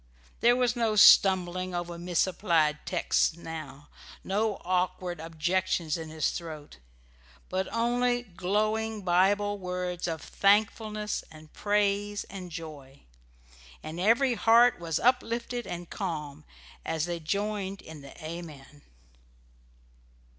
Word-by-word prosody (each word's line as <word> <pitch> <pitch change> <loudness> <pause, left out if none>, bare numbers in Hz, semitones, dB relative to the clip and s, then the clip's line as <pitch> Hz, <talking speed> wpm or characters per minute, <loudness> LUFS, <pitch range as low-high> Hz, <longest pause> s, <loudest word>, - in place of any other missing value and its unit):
There 240 +1 +5
was 250 -1 +1
no 225 -3 +1
stumbling 185 -3 +5
over 175 0 -4
misapplied 170 -3 +1
texts 170 -2 +1
now, 150 -4 -8 0.3
no 210 +2 0
awkward 180 -1 -1
objections 165 0 -1
in 160 -1 -6
his 155 -1 -1
throat, 155 - -8 0.7
but 190 +1 -2
only 245 +1 +1
glowing 215 +3 -1
Bible 200 +3 +2
words 180 -1 -3
of 160 -2 -4
thankfulness 210 +1 +1
and 155 -1 -15
praise 205 0 0
and 185 -3 -8
joy. 150 -5 -9 0.8
And 155 +2 -6
every 235 +7 +3
heart 235 +1 +5
was 165 -2 -2
uplifted 240 0 0
and 175 0 -6
calm 155 -7 -5 0.4
as 160 -1 -1
they 175 -1 -3
joined 200 +3 -3
in 155 -2 -10
the 140 - -13
"Amen." 155 -4 -9
185 Hz, 110 wpm, -28 LUFS, 165-210 Hz, 0.8 s, There